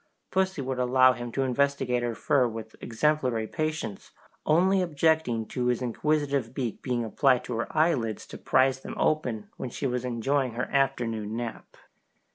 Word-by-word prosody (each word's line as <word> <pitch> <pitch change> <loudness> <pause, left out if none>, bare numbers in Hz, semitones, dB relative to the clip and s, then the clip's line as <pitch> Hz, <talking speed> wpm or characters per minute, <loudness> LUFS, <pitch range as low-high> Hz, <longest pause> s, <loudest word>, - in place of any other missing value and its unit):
Pussy 190 -6 0
would 130 0 -3
allow 130 +1 +5
him 120 -1 -6
to 135 - 0
investigate 130 -1 +1
her 120 -1 -2
fur 130 +1 +2
with 110 -1 -7
exemplary 125 -1 0
patience, 155 -5 -4 0.4
only 185 +5 +4
objecting 160 -8 +1
to 125 -1 -1
his 125 -1 +1
inquisitive 140 0 -1
beak 125 -5 -3
being 120 -3 -1
applied 125 +3 +2
to 125 - -5
her 115 - -1
eyelids 140 - +1
to - - -10
prize 130 0 +3
them - - -8
open 125 -9 0
when 130 - -4
she 130 - -5
was 125 -1 -1
enjoying 125 +1 0
her 120 +2 -2
afternoon 115 -6 0
nap. 120 -2 -6
125 Hz, 160 wpm, -27 LUFS, 120-145 Hz, 0.4 s, allow